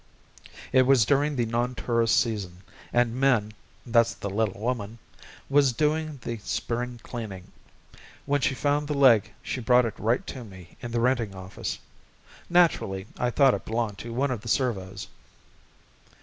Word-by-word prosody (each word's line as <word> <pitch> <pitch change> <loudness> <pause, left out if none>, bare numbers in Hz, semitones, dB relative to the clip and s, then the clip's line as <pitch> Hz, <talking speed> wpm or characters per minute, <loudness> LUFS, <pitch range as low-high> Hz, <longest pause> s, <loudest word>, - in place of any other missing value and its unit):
It 130 -1 +5
was 130 -5 +5
during 145 +3 +2
the 120 -2 +1
non 120 +2 -1
tourist 115 0 +2
season 100 -7 -3 0.3
and 120 -1 +2
Min 125 -5 +2 0.3
that's 115 -1 +3
the 100 - -5
little 105 -1 -1
woman 115 -1 -3 0.5
was 140 -2 +4
doing 155 +2 0
the 115 -2 -4
spring 120 +3 -3
cleaning. 105 -7 -7 0.7
When 145 0 +1
she 135 - +1
found 145 +2 0
the 150 - -2
leg 125 -7 +5
she 130 - -4
brought 125 +1 +4
it 115 - -3
right 115 +4 0
to 130 - -7
me 95 -5 -13
in 120 - -5
the 115 0 -1
Renting 115 -5 +1
Office. 95 0 -5 0.7
Naturally 160 - +2
I 125 - +1
thought 135 +1 +4
it - - -3
belonged 110 -3 -2
to 115 - -7
one 130 +4 0
of 120 -5 -3
the 115 - -10
servos. 100 -7 -1
120 Hz, 160 wpm, -26 LUFS, 110-130 Hz, 0.7 s, It